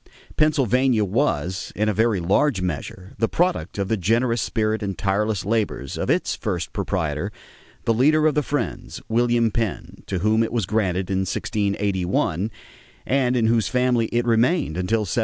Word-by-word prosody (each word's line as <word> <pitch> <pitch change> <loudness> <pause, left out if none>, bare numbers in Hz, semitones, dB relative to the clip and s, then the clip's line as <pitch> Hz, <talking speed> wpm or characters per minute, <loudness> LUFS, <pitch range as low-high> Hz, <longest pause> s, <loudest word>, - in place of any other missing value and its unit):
Pennsylvania 130 -6 +2
was, 95 - -1
in 105 +1 0
a 105 - +2
very 110 -1 +2
large 100 - +2
measure, 90 +2 -5
the 115 - +2
product 180 -8 0
of 100 -1 -1
the 110 - 0
generous 115 +5 +1
spirit 110 -1 -1
and 95 -3 -3
tireless 105 +1 0
labors 105 - -1
of - - -3
its - - +1
first - - -3
proprietor, 80 +6 -2 0.5
the 115 - +3
leader 155 +6 +3
of 155 - +4
the 150 - +2
Friends, 145 +1 -3
William 120 0 +2
Penn, 110 -3 -3
to 95 - -2
whom 110 +5 +2
it 115 - 0
was 115 -5 0
granted 95 -2 -1
in 95 - +1
1681 100 -2 -1 0.6
and 130 -2 +1
in 120 -2 +2
whose 115 -1 +2
family 125 -2 +1
it 120 +1 0
remained 120 - +2
until 90 +5 0
1776. 100 -1 -3
110 Hz, 165 wpm, -23 LUFS, 95-120 Hz, 0.6 s, of